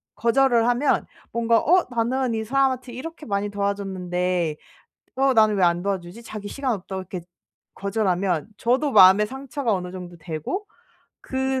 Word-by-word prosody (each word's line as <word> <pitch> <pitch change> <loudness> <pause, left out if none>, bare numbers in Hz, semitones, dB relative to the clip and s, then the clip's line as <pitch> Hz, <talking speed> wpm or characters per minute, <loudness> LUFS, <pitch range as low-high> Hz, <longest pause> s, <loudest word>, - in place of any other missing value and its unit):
거절을 235 0 +3
하면 245 +4 +2 0.3
뭔가 230 -1 +2
'어 360 +4 +3
나는 245 +1 0
이 220 0 -1
사람한테 260 0 0
이렇게 320 +5 -8
많이 200 0 -1
도와줬는데 185 -4 -1 0.6
어 270 0 +3
나는 215 -2 +4
왜 190 - +1
안 175 0 +2
도와주지?' 195 +2 -4
자기 210 -3 -7
시간 270 0 -2
없다고 190 0 -6
이렇게 185 -1 -6 0.5
거절하면 195 -3 -1
저도 260 +5 +1
마음에 190 +2 +7
상처가 265 -1 -3
어느 180 -2 -3
정도 180 -2 -8
되고 165 - -4 0.5
그 265 0 -1
215 Hz, 325 characters per minute, -23 LUFS, 185-260 Hz, 0.6 s, 마음에